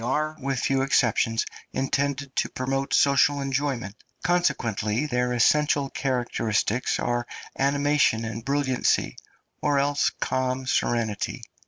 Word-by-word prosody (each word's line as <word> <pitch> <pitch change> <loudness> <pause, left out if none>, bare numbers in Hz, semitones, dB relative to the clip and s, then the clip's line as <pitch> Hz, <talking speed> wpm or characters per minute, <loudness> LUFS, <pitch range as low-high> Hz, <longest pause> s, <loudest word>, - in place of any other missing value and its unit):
They 115 - -4
were, 155 +4 0
with 135 -2 -2
few 135 -1 +1
exceptions, 120 -4 +2 0.3
intended 140 0 -1
to - - +1
promote 135 +1 -1
social 140 +1 +4
enjoyment; 135 -6 -2 0.3
consequently 130 - 0
their 125 -3 0
essential 140 +3 +2
characteristics 120 -3 0
are 120 0 -1 0.3
animation 140 -4 +2
and 110 +1 -5
brilliancy, 135 -1 +1 0.5
or 145 -1 +2
else 145 +1 +2
calm 130 0 -1
serenity. 115 -4 -1
135 Hz, 115 wpm, -25 LUFS, 120-140 Hz, 0.5 s, social